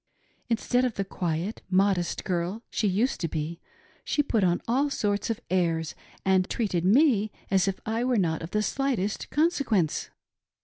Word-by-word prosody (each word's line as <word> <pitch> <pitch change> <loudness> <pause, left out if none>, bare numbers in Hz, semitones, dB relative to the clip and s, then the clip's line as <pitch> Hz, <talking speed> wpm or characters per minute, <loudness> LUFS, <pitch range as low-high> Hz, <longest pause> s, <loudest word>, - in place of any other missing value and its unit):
Instead 245 +2 +1
of 250 -3 0
the 195 - -1
quiet, 175 +2 -3
modest 185 -2 +1
girl 185 +3 -2
she 215 - +1
used 210 +7 +1
to 165 - 0
be, 160 +2 -4 0.4
she 290 - +1
put 225 -7 +1
on 175 -1 +3
all 270 +5 +2
sorts 205 -5 -1
of 225 - -1
airs, 165 -3 +1 0.3
and 190 -1 +3
treated 195 -7 -1
me 215 - +4 0.2
as 190 -1 +3
if 195 - -1
I 225 +2 -1
were 250 0 +2
of 210 - +3
not 165 -1 -1
the 210 +3 0
slightest 225 -4 -1
consequence. 280 - +1
200 Hz, 165 wpm, -27 LUFS, 180-235 Hz, 0.4 s, me